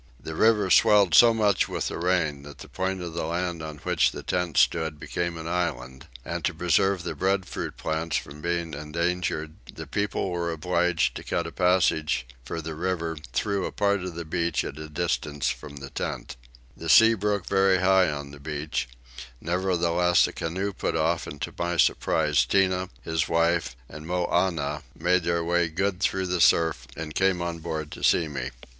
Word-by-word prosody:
The 80 - -7
river 105 +1 +3
swelled 100 -2 +5
so 120 -1 +8
much 105 -4 +2
with - - -2
the - - -5
rain 85 -5 0
that 70 0 -11
the 70 - -11
point 95 0 -3
of 85 -2 -6
land 85 +1 -2
on 80 -1 -7
which - - +3
the - - -8
tents 90 -4 +1
stood 80 -2 0
became 85 +1 -3
an 80 0 -6
island; 70 -5 -3 0.2
and - - -4
to - - 0
preserve 95 -2 +2
the 85 - -3
breadfruit 95 +4 -2
plants 80 +1 -1
from 75 +2 -8
being 85 -1 -2
endangered 80 +1 -2 0.2
the - - -8
people 100 -2 -2
were 85 -1 -2
obliged 85 +1 +1
to - - -8
cut - - -2
a - - -5
passage 90 -7 +2 0.2
for 85 +7 -5
the 80 +1 -5
river 85 0 -2 0.2
through 100 - -1
a - - -6
part 100 -1 +1
of 90 -2 -6
the 85 0 -5
beach 85 +1 -1
at 70 - -7
a 80 0 -7
distance 75 -3 -1
from 75 -1 -6
the 70 -1 -9
tents. - - -4 0.4
The 80 - -6
sea 115 +8 +8
broke 105 -2 -1
very 95 -1 +3
high 95 -1 +4
on 70 -1 -5
the 70 - -12
beach; 75 -2 -3 0.5
nevertheless 90 0 +2
a - - -5
canoe 95 +5 -3
put - - -2
off 80 +1 0
and 75 - -8
to - - -4
my 85 0 -1
surprise 75 -3 +3
Tinah, 95 +5 +1
his 80 0 -1
wife, 85 -4 +1
and 75 +3 -10
Moannah 85 -4 0
made 90 +2 +2
their 85 -1 +1
way 85 0 +2
good 95 +3 -1
through 95 -1 0
the 90 -1 -1
surf 80 -8 +3
and 80 -1 -5
came 95 +2 +2
on 85 -1 -3
board 80 -2 -4
to - - -9
see 80 - +3
me. 65 -4 -4
85 Hz, 185 wpm, -26 LUFS, 80-90 Hz, 0.5 s, so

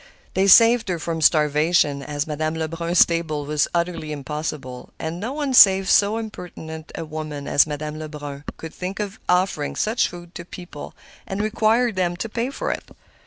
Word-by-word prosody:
They 190 +1 +2
saved 230 +1 +6
her 180 - 0
from 165 0 -4
starvation, 150 -1 +3
as 145 +1 -3
Madame 155 +1 -2
Lebrun's 165 +2 +2
table 160 -3 -2
was 150 0 +1
utterly 170 -3 -2
impossible; 145 -3 -5
and 160 +2 -5
no 225 +6 -4
one 285 -2 -2
save 195 -5 +7
so 205 +2 +4
impertinent 170 -7 -8
a 165 - -5
woman 155 -2 -6
as 145 - +4
Madame 150 +1 -5
Lebrun 145 -2 -7
could 160 -1 -8
think 185 +2 -5
of 205 -2 -4
offering 180 -5 +1
such 225 +3 +1
food 175 0 -11
to 170 - -7
people 175 0 -10 0.3
and 195 -2 -4
requiring 220 +2 +2
them 175 -2 -1
to 225 - -3
pay 230 +3 -2
for - - -3
it. - - -6
170 Hz, 170 wpm, -22 LUFS, 150-195 Hz, 0.3 s, save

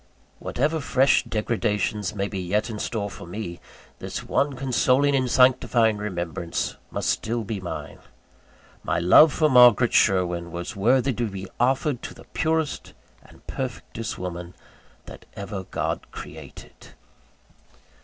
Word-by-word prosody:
Whatever 155 +5 -1
fresh 135 -1 +3
degradations 105 -2 -1
may 100 0 -1
be 100 -2 -5
yet 105 +6 -1
in 105 - -6
store 105 -2 -2
for 90 -2 -10
me, 90 -2 -6 0.4
this - - -5
one 140 0 0
consoling 135 +2 +2
and 130 -2 +1
sanctifying 120 -3 +4
remembrance 85 -4 -3
must - - -3
still 115 +1 -1
be 105 -1 -4
mine. 90 - -6 0.8
My - - 0
love 120 - +7
for 155 - +2
Margaret 125 -3 +6
Sherwin 90 -4 +2
was 85 +7 -5
worthy 125 +6 +2
to 120 0 -2
be 95 -1 -7
offered 130 +1 +1
to - - -8
the - - -15
purest 160 -2 -1 0.3
and - - -19
perfectest 125 -3 -5
woman 90 -1 -6 0.5
that - - -12
ever 100 -1 -5
God - - -3
created. - - -11
110 Hz, 135 wpm, -24 LUFS, 95-130 Hz, 0.8 s, love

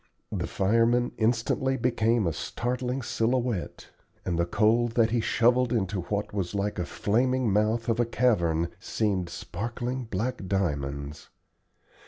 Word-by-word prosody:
The - - -2
fireman 115 +5 +2
instantly 120 +4 +1
became 115 -2 +1
a 85 - 0
startling 125 - -3
silhouette, 120 -4 -1 0.4
and 85 -2 -1
the 85 - +1
coal 115 +5 +3
that 115 -1 +2
he 120 -1 +2
shovelled 120 +2 +3
into 100 -5 0
what 100 +4 -3
was 100 -1 -2
like 100 -1 -1
a 90 - -1
flaming 125 +2 +1
mouth 110 +3 +1
of 115 0 +1
a 120 - +3
cavern 85 -10 +1
seemed 95 -5 -1
sparkling 120 +8 -4
black 110 0 -3
diamonds. 70 -6 -2
110 Hz, 135 wpm, -27 LUFS, 95-120 Hz, 0.4 s, coal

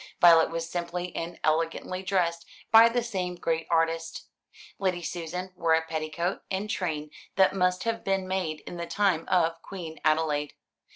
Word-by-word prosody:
Violet 165 -2 +7
was 165 0 -3
simply 175 +1 -4
and 170 +1 -5
elegantly 165 +3 0
dressed 175 -3 0 0.2
by 225 +1 +9
the 240 +1 0
same 185 -6 -3
great 165 -2 -2
artist. 165 0 0 0.5
Lady 180 -3 0
Susan 180 +2 -5
wore 165 -2 +3
a 160 - +1
petticoat 160 +3 -2
and 195 +2 -2
train 155 -7 -3 0.2
that 190 0 +4
must 180 -1 +1
have 230 0 -2
been 195 -1 0
made 180 -5 -2
in 175 - -8
the 170 0 -4
time 190 -4 +1
of 165 -2 +2
Queen 170 -5 -8
Adelaide. 155 -2 +1
170 Hz, 160 wpm, -27 LUFS, 165-185 Hz, 0.5 s, by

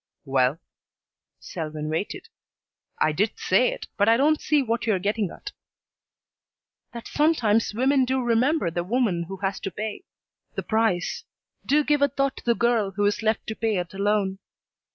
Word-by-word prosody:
"Well 135 +2 +1 0.4
" - - -63
Selwyn 155 -3 -4
waited. 160 +6 -3 0.7
"I 155 - +3
did 200 +8 0
say 195 +7 +3
it, - - -7
but 205 +1 +4
I 230 - +5
don't 300 +4 +3
see 295 -2 +2
what 230 -2 -2
you're 215 -4 +3
getting 205 +1 -1
at." 415 - -9 1.4
"That 235 -1 -8
sometimes 230 -9 +2
women 265 +2 +3
do 260 +1 0
remember 245 - +1
the 175 +1 -2
woman 195 -4 0
who 195 +1 -6
has 195 0 -1
to - - -4
pay 215 - -6 0.5
the - - -3
price; 220 -5 0 0.4
do 300 +2 +3
give 295 -1 +1
a 285 - +5
thought 275 0 -1
to - - -10
the 235 -1 +3
girl 235 -4 +2
who 205 +2 -1
is 205 +2 +1
left 220 0 0
to 220 - -4
pay 220 -3 0
it 175 0 -4
alone. 200 -1 0
220 Hz, 175 wpm, -25 LUFS, 190-250 Hz, 1.4 s, I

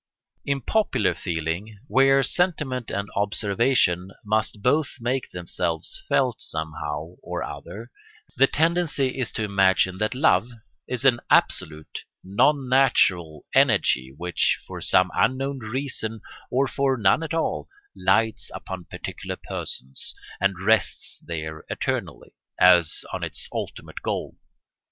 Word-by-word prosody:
In 140 -1 -1
popular 160 - +1
feeling, 85 +6 -4
where 135 0 +4
sentiment 150 -8 0
and 100 +1 -2
observation 100 -2 +1 0.2
must 105 -1 0
both 145 +3 +2
make 125 +3 -2
themselves 85 -2 -2
felt 125 -4 +1
somehow 80 +1 -4
or - - -4
other, 115 +4 -8 0.4
the 135 +2 +5
tendency 160 -5 +1
is 125 - +1
to 110 - -2
imagine 95 -2 +2
that 105 +3 0
love 120 - +3 0.4
is 125 +1 -1
an 125 -3 +5
absolute, 75 0 +1 0.2
non 130 +8 +2
natural 90 - +2
energy 65 +1 +3
which, 90 +1 +1
for - - -8
some 90 0 +3
unknown 135 +2 0
reason, 115 -2 -2 0.3
or 135 +2 +2
for 135 -1 0
none 100 +6 +3
at 165 0 -3
all, 165 - -1 0.3
lights 110 0 +1
upon 95 -2 -7
particular - - -6
persons, 65 +1 -6 0.2
and 95 -1 0
rests 110 +1 +2
there 80 -2 -5
eternally, - - -3 0.3
as 90 -3 +5
on - - -3
its - - -3
ultimate - - -6
goal. - - -3
110 Hz, 125 wpm, -24 LUFS, 90-135 Hz, 0.4 s, the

